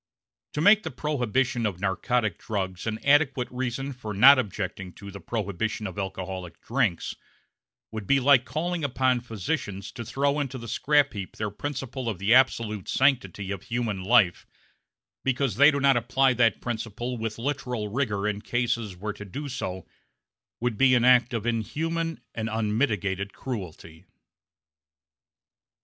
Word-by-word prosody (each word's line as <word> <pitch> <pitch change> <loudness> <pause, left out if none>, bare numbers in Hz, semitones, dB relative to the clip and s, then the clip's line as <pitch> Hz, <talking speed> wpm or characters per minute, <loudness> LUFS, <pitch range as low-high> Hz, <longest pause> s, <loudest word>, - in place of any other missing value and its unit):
To 150 - -1
make 205 +5 +6
the 160 - -4
prohibition 125 -4 0
of 95 -4 -5
narcotic 100 +2 0
drugs 95 -3 -4
an 110 0 -1
adequate 140 -3 +3
reason 130 +2 -3
for 110 -5 -6
not 130 +6 +8
objecting 95 -4 -4
to 100 0 -10
the 100 - -9
prohibition 110 0 -3
of 95 +1 -5
alcoholic 95 -3 -5
drinks 115 -9 -1 0.8
would 110 -3 -6
be 140 - +4
like 130 -1 +5
calling 160 +6 -3
upon 130 -2 +1
physicians 105 - -4
to 120 - -7
throw 140 +5 0
into 135 -2 -3
the 115 -1 -8
scrap 145 +4 +2
heap 100 -3 -6
their 105 -1 -2
principle 135 -1 -4
of 105 - -3
the 100 +5 +2
absolute 115 -6 +2
sanctity 130 -7 +1
of 100 -2 -4
human 110 -4 -3
life 100 -4 +3 0.8
because 130 -4 0
they 145 +2 +8
do 140 -2 0
not 135 -1 +4
apply 130 +2 +2
that 115 -2 +2
principle 120 +1 -4
with 110 -1 -3
literal 125 -4 -3
rigor 105 -3 -1
in 105 -1 -2
cases 115 -5 -1
where 105 +3 -4
to 105 - -9
do 140 +10 -6
so 95 -9 -5 0.7
would 120 -2 -2
be 130 -1 +6
an 120 -1 +3
act 125 -1 +5
of 115 -3 -3
inhuman 165 +8 -2
and 110 0 -3
unmitigated 105 -3 -1
cruelty. 90 -9 -7
115 Hz, 150 wpm, -26 LUFS, 100-135 Hz, 0.8 s, not